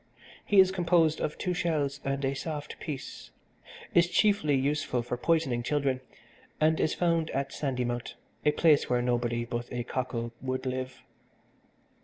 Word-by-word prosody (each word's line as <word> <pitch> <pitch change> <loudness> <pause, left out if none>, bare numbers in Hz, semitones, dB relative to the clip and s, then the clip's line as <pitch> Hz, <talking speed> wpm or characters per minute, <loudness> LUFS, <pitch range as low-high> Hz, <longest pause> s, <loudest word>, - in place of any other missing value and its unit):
He 205 - +4
is 190 0 +7
composed 170 -4 +2
of 150 - -2
two 180 - -1
shells 150 -6 -1
and 135 0 -1
a 135 - 0
soft 150 +1 -5
piece, 145 -4 -7 0.6
is 175 0 +5
chiefly 200 -7 +3
useful 135 -2 0
for 120 +1 -3
poisoning 135 -3 +1
children 135 0 0 0.6
and 160 +1 +3
is 155 - +1
found 165 -2 +1
at 135 +1 -2
Sandymount, 125 -3 -2 0.3
a 150 - +4
place 150 -1 +3
where 125 -1 +2
nobody 120 -1 0
but 120 0 -5
a 120 -1 -2
cockle 120 -2 -3
would 130 0 -3
live. 130 0 -4
140 Hz, 150 wpm, -29 LUFS, 125-160 Hz, 0.6 s, is